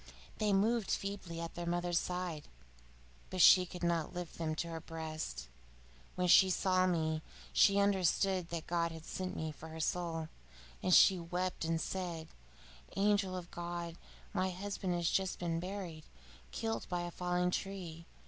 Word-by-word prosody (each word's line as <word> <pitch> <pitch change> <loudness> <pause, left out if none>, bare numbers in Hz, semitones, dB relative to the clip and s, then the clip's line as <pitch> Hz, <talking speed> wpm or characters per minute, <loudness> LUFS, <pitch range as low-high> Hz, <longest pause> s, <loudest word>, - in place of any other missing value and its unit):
They 210 -1 +2
moved 210 +2 +2
feebly 195 -4 -3
at 170 0 -5
their 175 0 -5
mother's 175 0 +1
side, 180 -4 -4 0.8
but 185 - -4
she 180 +1 +8
could 180 0 -8
not 170 0 0
lift 175 -2 -6
them 155 -1 -1
to 170 - -2
her 165 -1 -4
breast. 155 - -5 0.7
When 180 0 +1
she 190 +2 +8
saw 185 0 +3
me, 160 -3 0 0.3
she 200 0 +6
understood 190 -2 +2
that 170 -2 -4
God 170 -1 0
had 160 -1 -9
sent 185 -1 -4
me 160 0 -3
for 160 +1 -10
her 160 0 -8
soul, 165 -1 -1 0.5
and 185 - 0
she 185 +1 +7
wept 180 +1 -2
and 165 0 0
said: 170 -3 -4 0.7
'Angel 200 -2 +2
of 175 -1 -8
God! 170 -1 -4 0.4
My 190 -1 +1
husband 185 0 -3
has 170 -1 0
just 190 +1 +1
been 165 -1 -1
buried, 180 -4 -6 0.5
killed 225 -1 -2
by 175 -1 -1
a 175 0 -4
falling 180 0 0
tree. 175 -4 -4
175 Hz, 160 wpm, -34 LUFS, 165-185 Hz, 0.8 s, she